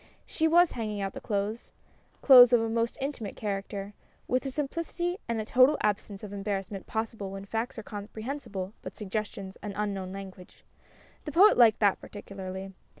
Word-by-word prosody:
She 320 Hz, -, 0 dB
was 345 Hz, +1 st, +5 dB
hanging 215 Hz, -3 st, -4 dB
out 195 Hz, -1 st, -3 dB
the -, -, -8 dB
clothes 210 Hz, +2 st, -3 dB, 0.5 s
clothes 250 Hz, -3 st, +9 dB
of 240 Hz, -, +7 dB
a 225 Hz, -, 0 dB
most 230 Hz, +1 st, -1 dB
intimate 265 Hz, -7 st, -4 dB
character 200 Hz, -1 st, -4 dB, 0.3 s
with 255 Hz, +1 st, +1 dB
a -, -, -1 dB
simplicity 335 Hz, +6 st, -3 dB
and 230 Hz, -1 st, -1 dB
a 215 Hz, -, -3 dB
total 255 Hz, +6 st, +5 dB
absence 205 Hz, -1 st, -2 dB
of 205 Hz, -1 st, -7 dB
embarrassment 195 Hz, -1 st, -4 dB
possible 220 Hz, -2 st, -3 dB
when 195 Hz, 0 st, -7 dB
facts 225 Hz, +4 st, -3 dB
are 220 Hz, -, -6 dB
comprehensible 210 Hz, -1 st, -6 dB
but -, -, -8 dB
suggestions 200 Hz, -2 st, -5 dB
an 205 Hz, -2 st, -5 dB
unknown 200 Hz, -3 st, -3 dB
language. 190 Hz, -2 st, -10 dB, 0.6 s
The 300 Hz, -, -4 dB
Poet 390 Hz, +8 st, +7 dB
liked 225 Hz, -3 st, +5 dB
that 200 Hz, -2 st, +3 dB
particularly. 195 Hz, -1 st, -8 dB
215 Hz, 165 wpm, -28 LUFS, 195-245 Hz, 0.6 s, clothes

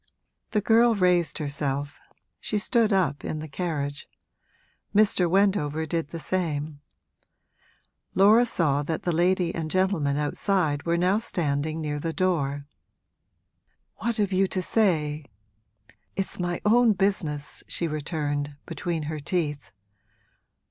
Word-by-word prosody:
The 210 Hz, -, +1 dB
girl 230 Hz, +2 st, +4 dB
raised 180 Hz, -3 st, +2 dB
herself, 145 Hz, -1 st, -3 dB, 0.4 s
she 210 Hz, -, -2 dB
stood 225 Hz, +1 st, +2 dB
up 170 Hz, -7 st, +1 dB
in 155 Hz, -, -3 dB
the 155 Hz, +1 st, -6 dB
carriage. 145 Hz, -3 st, -4 dB, 0.9 s
Mr. 200 Hz, -4 st, +4 dB
Wendover 170 Hz, -5 st, +2 dB
did 165 Hz, -1 st, -2 dB
the 165 Hz, -, -7 dB
same; 155 Hz, -5 st, -2 dB, 1.3 s
Laura 215 Hz, +5 st, +6 dB
saw 150 Hz, -9 st, +1 dB
that 155 Hz, +2 st, -3 dB
the 175 Hz, -, 0 dB
lady 175 Hz, +1 st, +2 dB
and 160 Hz, -2 st, -3 dB
gentleman 180 Hz, -6 st, +1 dB
outside 150 Hz, 0 st, 0 dB
were 170 Hz, 0 st, +2 dB
now 185 Hz, +4 st, +2 dB
standing 155 Hz, -5 st, -2 dB
near 150 Hz, -1 st, -3 dB
the 165 Hz, +2 st, -3 dB
door. 145 Hz, -7 st, 0 dB, 1.3 s
'What 235 Hz, +1 st, -2 dB
have 205 Hz, -2 st, +1 dB
you 190 Hz, +1 st, +3 dB
to 185 Hz, 0 st, -2 dB
say? 155 Hz, -9 st, +1 dB, 0.9 s
It's 195 Hz, -1 st, -3 dB
my 175 Hz, -1 st, -1 dB
own 230 Hz, +1 st, +5 dB
business!' 180 Hz, -7 st, -1 dB
she 170 Hz, -, -1 dB
returned, 145 Hz, -2 st, -3 dB
between 170 Hz, -3 st, -3 dB
her 155 Hz, +1 st, -4 dB
teeth. 145 Hz, -, -2 dB
165 Hz, 125 wpm, -26 LUFS, 150-190 Hz, 1.3 s, Laura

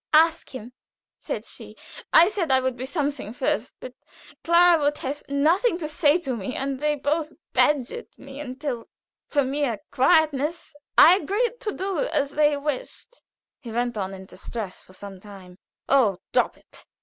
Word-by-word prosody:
"'Ask 325 Hz, +1 st, +4 dB
him,' 245 Hz, 0 st, -8 dB, 0.5 s
said -, -, -5 dB
she. -, -, -11 dB, 0.4 s
I 340 Hz, -, +7 dB
said 380 Hz, -7 st, -2 dB
I 260 Hz, -1 st, +4 dB
would 260 Hz, -1 st, -1 dB
be 255 Hz, +2 st, -6 dB
something 285 Hz, -, -3 dB
first. 250 Hz, -2 st, -2 dB
But 255 Hz, -, -9 dB, 0.5 s
Clara 340 Hz, -1 st, +5 dB
would 290 Hz, 0 st, +1 dB
have 280 Hz, +2 st, -4 dB
nothing 335 Hz, -, +2 dB
to 320 Hz, -4 st, -4 dB
say 300 Hz, 0 st, +3 dB
to 265 Hz, -6 st, -3 dB
me, 225 Hz, +3 st, -5 dB
and 270 Hz, -1 st, -3 dB
they 300 Hz, +1 st, +1 dB
both 300 Hz, +2 st, -1 dB, 0.2 s
badgered 280 Hz, -5 st, +1 dB
me 275 Hz, 0 st, -11 dB
until 260 Hz, -3 st, -5 dB, 0.4 s
for 285 Hz, -2 st, +1 dB
mere 265 Hz, -3 st, -1 dB
quietness 305 Hz, +2 st, +2 dB, 0.2 s
I 345 Hz, +4 st, +9 dB
agreed 440 Hz, +8 st, -1 dB
to 445 Hz, -4 st, -3 dB
do 385 Hz, -1 st, -3 dB
as 300 Hz, -, 0 dB
they 295 Hz, 0 st, +2 dB
wished." 295 Hz, -, -5 dB, 0.4 s
He 235 Hz, -, -9 dB
went 240 Hz, +1 st, -1 dB
on 195 Hz, -2 st, -4 dB
in 190 Hz, 0 st, -11 dB
distress 205 Hz, 0 st, -7 dB
for 185 Hz, -, -19 dB
some 195 Hz, 0 st, -10 dB
time. 190 Hz, -2 st, -13 dB, 0.3 s
"Oh, 235 Hz, -9 st, +3 dB, 0.2 s
drop -, -, +1 dB
it!" -, -, -13 dB
285 Hz, 165 wpm, -24 LUFS, 250-320 Hz, 0.5 s, I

